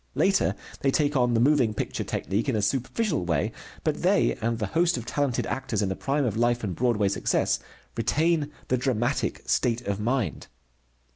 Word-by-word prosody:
Later 195 0 +2 0.2
they 140 - +1
take 145 +1 +1
on 125 -2 +3
the - - +3
moving 125 -4 +3
picture - - -3
technique 105 +8 -2
in 130 - +1
a 105 - +1
superficial 140 - 0
way, 80 -5 0 0.3
but - - -1
they, - - +3
and 115 +1 0
the 110 - -1
host 170 -3 +3
of 120 - -5
talented 140 -1 0
actors 115 -6 -2
in 95 - 0
the 95 - -2
prime 140 +5 0
of 110 - -1
life 120 +1 +1
and 95 -5 -2
Broadway 115 -3 +2
success, 95 - +1 0.4
retain 150 +5 +1 0.2
the 130 - +3
dramatic 125 0 -1
state 120 -2 +1
of 100 -4 -3
mind. 115 - -1
120 Hz, 185 wpm, -26 LUFS, 110-140 Hz, 0.4 s, on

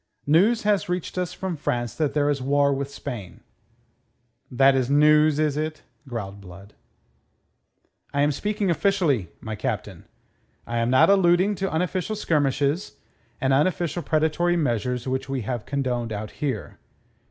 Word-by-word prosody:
"News 195 +11 +3
has 205 -3 +1
reached 180 -1 -3
us 180 -2 -2
from 190 -2 -4
France 120 -6 -2
that 155 -3 -1
there 145 -1 +2
is 145 -2 0
war 140 +1 +2
with 140 0 -3
Spain." 120 -9 -8 1.1
"That 135 +2 +4
is 130 -1 0
news, 150 +1 +5
is 150 -2 +1
it?" 155 0 -3 0.2
growled 100 -5 -6
Blood. 95 +2 -13 1.4
"I 140 - 0
am 145 - +3
speaking 205 +4 -1
officially, 165 - +1
my 110 -1 -5
Captain. - - -4 0.6
I 120 - -3
am 115 +1 +1
not 130 +9 +5
alluding 190 +1 +4
to 195 +1 -2
unofficial 180 +5 -1
skirmishes, 150 -2 0 0.5
and 135 0 +1
unofficial 175 +3 +1
predatory 160 +3 +1
measures 125 -3 -1
which 130 +1 -2
we 135 -2 -2
have 115 0 -4
condoned 125 -5 -2
out 105 0 -5
here. 140 -3 -4
145 Hz, 145 wpm, -24 LUFS, 125-175 Hz, 1.4 s, news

